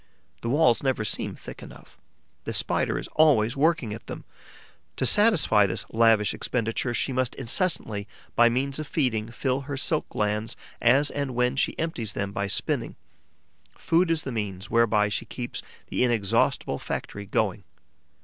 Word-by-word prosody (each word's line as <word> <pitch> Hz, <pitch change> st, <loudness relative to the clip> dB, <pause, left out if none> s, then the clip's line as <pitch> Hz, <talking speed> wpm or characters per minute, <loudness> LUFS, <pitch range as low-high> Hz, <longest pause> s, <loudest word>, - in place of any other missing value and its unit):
The 115 Hz, -, -3 dB
walls 125 Hz, -3 st, +3 dB
never 130 Hz, -6 st, 0 dB
seem -, -, -3 dB
thick -, -, -10 dB
enough; -, -, -13 dB, 0.5 s
the -, -, -3 dB
Spider -, -, +1 dB
is -, -, -4 dB
always 135 Hz, -7 st, +3 dB
working 145 Hz, -6 st, +1 dB
at 110 Hz, -, -10 dB
them. -, -, -7 dB, 0.7 s
To -, -, -1 dB
satisfy 160 Hz, -, +5 dB
this 90 Hz, -, -1 dB
lavish 115 Hz, -2 st, +4 dB
expenditure, 120 Hz, 0 st, -2 dB
she 135 Hz, -, -1 dB
must 130 Hz, -1 st, -1 dB
incessantly, 115 Hz, -, -1 dB, 0.3 s
by 120 Hz, 0 st, +6 dB
means 135 Hz, +4 st, -1 dB
of 155 Hz, -, -5 dB
feeding, 115 Hz, -8 st, -1 dB
fill 130 Hz, +3 st, -1 dB
her 140 Hz, 0 st, -5 dB
silk 155 Hz, +3 st, -1 dB
glands 105 Hz, +2 st, -1 dB, 0.3 s
as 135 Hz, +5 st, +4 dB
and 140 Hz, -3 st, -3 dB
when 125 Hz, +1 st, +1 dB
she 140 Hz, -, 0 dB
empties 125 Hz, -11 st, -3 dB
them 100 Hz, -1 st, -3 dB
by 100 Hz, 0 st, -2 dB
spinning. -, -, -2 dB, 0.8 s
Food 170 Hz, +2 st, +2 dB
is 165 Hz, -2 st, +1 dB
the 135 Hz, -, -4 dB
means 100 Hz, -4 st, -4 dB
whereby 110 Hz, -3 st, +3 dB
she 100 Hz, -, -3 dB
keeps 120 Hz, -1 st, -5 dB, 0.3 s
the -, -, 0 dB
inexhaustible 115 Hz, -3 st, +1 dB
factory 100 Hz, 0 st, -5 dB
going. -, -, 0 dB
120 Hz, 160 wpm, -26 LUFS, 110-140 Hz, 0.8 s, by